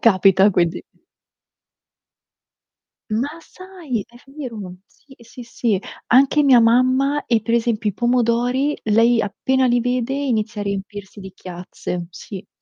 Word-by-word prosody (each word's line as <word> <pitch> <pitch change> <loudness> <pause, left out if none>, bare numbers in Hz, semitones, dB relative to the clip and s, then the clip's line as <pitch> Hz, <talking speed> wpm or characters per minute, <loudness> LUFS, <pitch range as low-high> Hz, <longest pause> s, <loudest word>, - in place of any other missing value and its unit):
capita 195 -2 +5
quindi. 175 -3 0 2.3
Ma 235 +7 0
sai 335 - -7
è 240 - -19
vero. 235 -10 -8
Sì, 280 - -23
ehm, 235 - -18
sì, 245 +2 -11
sì. 230 -3 -1 0.3
Anche 275 +4 +4
mia 265 -3 +6
mamma, 255 +5 +2
e, 230 -2 +2
per 230 +2 -1
esempio, 225 -2 0
i - - -11
pomodori 245 +4 +1
lei 225 +2 +3
appena 260 +6 0
li 245 0 +2
vede 250 +1 -1
inizia 225 -7 -2
a - - -3
riempirsi 200 0 -6
di 190 -1 -10
chiazze, 180 -1 -7
sì, 190 +2 -9
sì. - - -42
235 Hz, 140 wpm, -20 LUFS, 205-255 Hz, 2.3 s, mia